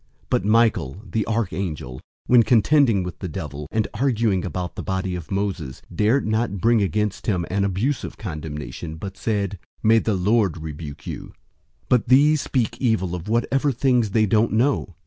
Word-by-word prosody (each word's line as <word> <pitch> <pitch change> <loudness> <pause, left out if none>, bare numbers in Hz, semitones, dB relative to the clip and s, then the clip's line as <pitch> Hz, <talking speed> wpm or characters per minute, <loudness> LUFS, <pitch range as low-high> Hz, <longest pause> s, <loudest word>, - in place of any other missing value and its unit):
001:009 - - -39 0.2
But - - +1
Michael, 105 - +2
the 110 +1 -1
archangel, 90 - -3 0.2
when 125 -1 +6
contending 115 -2 +4
with 90 -2 -7
the 95 - -4
devil 75 -2 -6
and 110 -1 0
arguing 115 -6 +1
about 90 -1 -4
the - - -6
body 95 -1 -2
of 90 -3 -6
Moses, 95 -9 -3
dared 110 +7 +2
not 110 -1 0
bring 115 +3 +3
against 105 +1 -1
him 90 -6 +1
an 100 +1 +1
abusive 100 +8 -1
condemnation, 80 -2 -6
but 95 +4 -7
said, 100 -1 -2 0.2
"May 115 +1 +5
the 110 -2 0
Lord 100 -1 +2
rebuke 75 -2 -8
you!" - - -7 0.5
001:010 - - -44
But 125 -3 +3
these 145 +4 +5
speak 120 -2 -1
evil 110 -8 +1
of 90 +3 -5
whatever 135 +5 +1
things 125 -3 +2
they 110 +2 +3
don't 110 +2 +2
know. 115 - +1
105 Hz, 170 wpm, -23 LUFS, 90-115 Hz, 0.5 s, when